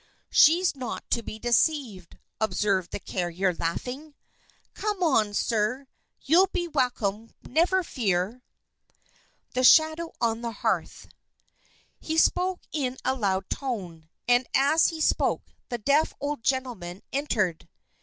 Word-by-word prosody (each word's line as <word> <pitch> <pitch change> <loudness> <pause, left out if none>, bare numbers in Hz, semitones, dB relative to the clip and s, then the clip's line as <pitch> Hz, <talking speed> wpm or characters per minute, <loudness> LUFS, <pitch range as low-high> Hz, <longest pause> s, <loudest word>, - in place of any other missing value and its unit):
"She's 340 +2 +5
not 255 -2 -6
to 235 - +2
be 215 - -8
deceived," 240 - 0 0.2
observed 195 -3 0
the - - -5
carrier, 180 0 -1
laughing. 250 - -4 0.6
"Come 420 -2 -3
along, 225 - +2
sir. 225 +6 0 0.4
You'll 350 +7 +4
be 345 -1 -2
welcome, 230 -7 -1
never 360 +7 +2
fear!" 210 - -1 1.1
The 255 - 0
Shadow 315 +4 +5
on 230 -1 0
the 235 -1 -4
Hearth - - -2 0.9
He 320 0 -3
spoke 360 +2 +2
in 260 -4 -2
a - - +2
loud 195 -6 -1
tone; 180 - -5 0.2
and 245 +1 +3
as 285 +4 +4
he 320 -1 -4
spoke, - - +1 0.3
the 240 - -2
deaf 285 +7 +1
old 290 -3 -3
gentleman 230 -10 -2
entered. 215 - -1
250 Hz, 125 wpm, -26 LUFS, 205-305 Hz, 1.1 s, She's